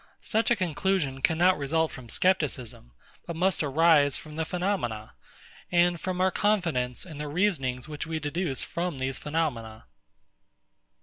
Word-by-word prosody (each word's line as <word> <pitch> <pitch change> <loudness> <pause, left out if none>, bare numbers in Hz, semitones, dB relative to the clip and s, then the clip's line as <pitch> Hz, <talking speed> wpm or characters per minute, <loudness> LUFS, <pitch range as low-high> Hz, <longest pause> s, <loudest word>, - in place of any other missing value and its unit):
Such 220 +1 +1
a 240 - +4
conclusion 180 -6 -1
cannot 175 +4 +3
result 160 +3 +1
from 125 -3 -10
Scepticism, 135 - 0 0.4
but 170 - -4
must 185 +3 +2
arise 150 -1 +4
from 155 - -10
the 160 +1 -2
phenomena, 170 - -2 0.6
and 175 -1 +3
from 185 -1 -3
our 185 0 +3
confidence 170 - 0
in 155 -5 -9
the 150 - -3
reasonings 145 -7 0
which 150 +1 -5
we 160 0 -2
deduce 145 -1 -2
from 170 -3 -3
these 130 0 -2
phenomena. 125 -9 -3
160 Hz, 140 wpm, -27 LUFS, 135-180 Hz, 0.6 s, a